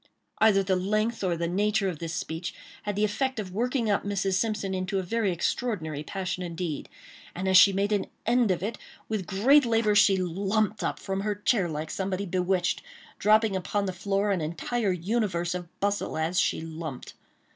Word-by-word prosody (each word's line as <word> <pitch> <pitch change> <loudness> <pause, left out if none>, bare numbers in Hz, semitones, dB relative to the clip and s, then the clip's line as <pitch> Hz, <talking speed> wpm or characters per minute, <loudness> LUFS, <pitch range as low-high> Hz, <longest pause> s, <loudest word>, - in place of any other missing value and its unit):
Either 205 -3 +5
the 190 0 +1
length 215 +4 0
or 175 -3 +1
the 170 0 -1
nature 200 +2 +1
of 170 -5 -3
this 165 -1 -4
speech, 160 +2 -4 0.3
had 205 -1 -3
the 205 - +1
effect 260 +5 0
of 185 -4 -5
working 245 +2 0
up 205 -1 +1
Mrs. 195 -1 -1
Simpson 205 -1 0
into 185 +1 -2
a 190 - 0
very 210 +1 0
extraordinary 170 -4 -2
passion 185 +3 -4
indeed; 170 -3 -4 0.5
and 185 +2 -3
as 190 - +3
she 190 +2 +9
made 200 +2 0
an 205 -2 +1 0.2
end 240 -1 +3
of 185 -1 0
it, 220 +3 -3 0.3
with 215 -5 -3
great 265 +10 +5
labor, 225 -3 +2
she 205 -2 +5
jumped 195 +4 0
up - - -1
from 195 0 -3
her 210 0 -1
chair 205 -3 +1
like 155 0 -4
somebody 190 0 -2
bewitched, 180 0 0 0.4
dropping 215 -1 +4
upon 200 +2 -1
the 190 - -2
floor 200 +2 0
an 185 -4 0
entire 195 +7 -1
universe 180 -2 -1
of 180 -1 -5
bustle 200 -3 -1
as 165 +3 +1
she - - +1 0.2
jumped. 155 -7 -6
195 Hz, 190 wpm, -27 LUFS, 180-210 Hz, 0.5 s, she